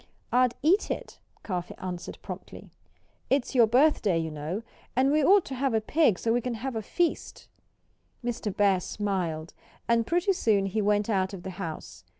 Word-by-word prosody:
"I'd 250 Hz, -1 st, +3 dB
eat 360 Hz, +7 st, +3 dB
it," -, -, -5 dB, 0.2 s
Cuffy 180 Hz, -4 st, -4 dB
answered 180 Hz, -2 st, -6 dB
promptly. -, -, -9 dB, 0.6 s
"It's 270 Hz, -1 st, +1 dB
your 240 Hz, -4 st, +6 dB
birthday, 240 Hz, -, +3 dB
you 160 Hz, -1 st, -2 dB
know. 155 Hz, +8 st, -4 dB, 0.3 s
And 265 Hz, +2 st, +3 dB
we 305 Hz, 0 st, +3 dB
ought 390 Hz, +5 st, +5 dB
to 275 Hz, -, -6 dB
have 260 Hz, -2 st, 0 dB
a -, -, +4 dB
pig 230 Hz, -, +2 dB
so 225 Hz, -, 0 dB
we 245 Hz, -, +1 dB
can 245 Hz, 0 st, -3 dB
have 260 Hz, +4 st, -4 dB
a 225 Hz, -, -2 dB
real -, -, -5 dB
feast." 340 Hz, -, -2 dB, 0.8 s
Mr. 235 Hz, -3 st, -2 dB
Bear 200 Hz, -2 st, +4 dB
smiled. 180 Hz, -5 st, -3 dB, 0.3 s
And 230 Hz, -1 st, +2 dB
pretty 355 Hz, +3 st, +2 dB
soon 210 Hz, -, +2 dB
he 195 Hz, +3 st, -1 dB
went 205 Hz, 0 st, +2 dB
out 195 Hz, -3 st, 0 dB
of 175 Hz, -, -10 dB
the 190 Hz, -, -5 dB
house. 160 Hz, -2 st, -7 dB
220 Hz, 180 wpm, -27 LUFS, 190-265 Hz, 0.8 s, your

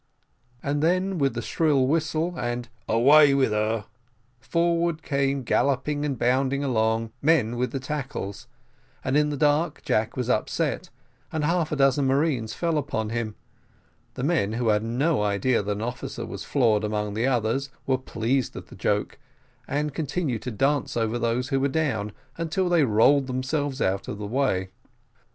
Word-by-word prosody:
And 145 Hz, +1 st, -1 dB
then 185 Hz, +3 st, +1 dB
with 135 Hz, -4 st, +1 dB
the 120 Hz, -, -3 dB
shrill 145 Hz, -3 st, +2 dB
whistle, 155 Hz, +3 st, 0 dB
and 120 Hz, -3 st, -3 dB, 0.2 s
"Away 140 Hz, +5 st, +6 dB
with 135 Hz, -5 st, +2 dB
her!" 105 Hz, 0 st, 0 dB, 0.5 s
forward 170 Hz, +3 st, 0 dB
came 140 Hz, -1 st, 0 dB
galloping 140 Hz, +4 st, +1 dB
and 140 Hz, -3 st, -2 dB
bounding 130 Hz, +4 st, +1 dB
along 115 Hz, -3 st, +1 dB
the -, -, -31 dB, 0.2 s
men 125 Hz, -8 st, +3 dB
with 125 Hz, +1 st, -1 dB
the 135 Hz, -, -3 dB
tackles; 130 Hz, -8 st, -5 dB, 0.6 s
and 130 Hz, -, 0 dB
in 150 Hz, 0 st, +3 dB
the 145 Hz, -, -3 dB
dark 150 Hz, +2 st, +1 dB
Jack 110 Hz, +3 st, 0 dB
was 125 Hz, -2 st, -1 dB
upset, 155 Hz, +8 st, -1 dB, 0.4 s
and 155 Hz, -2 st, -2 dB
half 165 Hz, +1 st, +1 dB
a -, -, 0 dB
dozen 135 Hz, 0 st, +3 dB
marines 135 Hz, -5 st, +1 dB
fell 165 Hz, -3 st, 0 dB
upon 110 Hz, -6 st, -3 dB
him; 115 Hz, -2 st, -3 dB, 0.8 s
the 125 Hz, -, -4 dB
men, 135 Hz, -10 st, +1 dB
who 115 Hz, 0 st, 0 dB
had 105 Hz, 0 st, +3 dB
no 125 Hz, +5 st, 0 dB
idea 105 Hz, +4 st, +1 dB
that 100 Hz, +1 st, -3 dB
an 105 Hz, +1 st, -3 dB
officer 120 Hz, +1 st, -5 dB
was -, -, -7 dB
floored 115 Hz, -6 st, +2 dB
among 105 Hz, -1 st, -2 dB
the 115 Hz, +4 st, 0 dB
others, 130 Hz, +2 st, 0 dB, 0.2 s
were 130 Hz, -1 st, +1 dB
pleased 125 Hz, +1 st, -1 dB
at -, -, -9 dB
the -, -, -11 dB
joke, 105 Hz, +6 st, -1 dB, 0.5 s
and 145 Hz, +1 st, -1 dB
continued 150 Hz, -5 st, -2 dB
to 125 Hz, -, -4 dB
dance 135 Hz, +4 st, 0 dB
over 115 Hz, +1 st, 0 dB
those 120 Hz, +2 st, 0 dB
who 135 Hz, -, +1 dB
were 135 Hz, -, +2 dB
down, 135 Hz, -8 st, -1 dB, 0.3 s
until 180 Hz, +3 st, 0 dB
they 170 Hz, -3 st, +4 dB
rolled 130 Hz, +4 st, +4 dB
themselves 135 Hz, +2 st, -2 dB
out 95 Hz, +1 st, 0 dB
of 105 Hz, -, -5 dB
the 105 Hz, -, -5 dB
way. 100 Hz, -5 st, 0 dB
130 Hz, 170 wpm, -25 LUFS, 115-150 Hz, 0.8 s, Away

